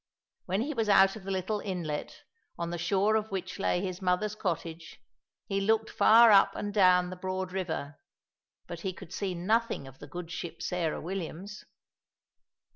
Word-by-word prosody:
When 190 +3 0
he 295 +5 -2
was 225 -5 -1
out 195 0 +6
of 205 -3 -10
the - - -5
little 195 +2 -1
inlet, 170 -7 -4 0.3
on 170 0 -3
the 175 - -4
shore 195 +5 +2
of 220 0 0
which 195 0 -5
lay 180 -2 +1
his 185 -1 -4
mother's 185 +3 +1
cottage, 165 -6 -4 0.5
he 195 0 -1
looked 220 +2 +1
far 230 +1 +7
up 195 -1 +6
and 205 0 -4
down 180 -3 +4
the - - -5
broad 185 0 -4
river, 165 -6 -4 0.7
but 170 -1 -7
he 185 +2 -3
could 180 -1 -11
see 190 -2 -2
nothing 215 -3 0
of 135 0 -14
the 145 - -10
good 170 +2 -7
ship 170 -2 -6
Sarah 170 -3 -1
Williams. 190 +3 -6
185 Hz, 175 wpm, -29 LUFS, 175-205 Hz, 0.7 s, far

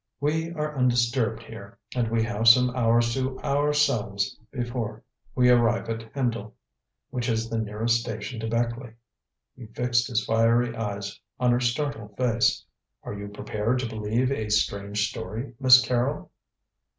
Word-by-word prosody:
We 160 +3 -1
are 150 -2 -3
undisturbed 120 -2 +1
here, 105 -3 -11 0.2
and 120 -3 0
we 115 0 +1
have 115 0 -1
some 125 +2 +7
hours 115 -1 +3
to 130 0 -2
ourselves 140 -9 +1
before 120 -4 -4 0.3
we 125 -1 +5
arrive 115 -1 +3
at 115 0 -6
Hendle, 115 -5 -2 0.6
which 125 0 -2
is 115 0 -1
the 115 - 0
nearest 110 +2 0
station 110 0 -5
to 115 - -3
Beckleigh." 115 +1 -2 0.6
He 125 -3 -11
fixed 120 +2 0
his 115 -4 -1
fiery 115 +1 +2
eyes 100 -3 -4 0.2
on 125 -1 +3
her 120 - +3
startled 120 -4 -2
face. 120 -3 +1 0.4
"Are - - -6
you 100 0 -6
prepared 105 +3 -2
to 125 -1 -2
believe 110 +4 -1
a 110 -6 -2
strange 105 0 0
story, 115 +4 -6
Miss 130 -1 +8
Carrol?" 125 +4 -1
115 Hz, 150 wpm, -26 LUFS, 110-125 Hz, 0.6 s, Miss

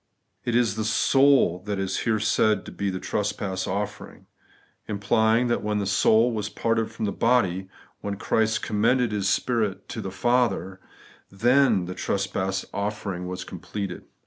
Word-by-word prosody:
It 120 - 0
is 115 -4 +2
the 110 - -1
soul 135 -4 +4
that 100 -1 -1
is 95 -1 -2
here 110 -2 0
said 105 -1 +2
to - - -8
be 100 - -2
the 95 -1 -3
trespass 95 -2 -2
offering; 100 +2 -5 0.6
implying 110 +3 +2
that 120 -1 0
when 105 0 -1
the 100 - -1
soul 110 +4 +4
was 105 -2 -3
parted 115 0 0
from - - -4
the 100 - -1
body, 95 -7 +1 0.3
when 100 0 -4
Christ 110 +2 0
com 105 -1 -2
mended 125 0 +3
His 100 -2 0
spirit 110 -6 0
to - - -5
His 95 0 -6
Father, 120 -7 +1 0.5
then 120 -1 +3
the 90 - -5
trespass 95 0 -2
offering 100 -3 -3
was 90 0 -5
completed. 95 +1 -6
105 Hz, 160 wpm, -25 LUFS, 95-115 Hz, 0.6 s, soul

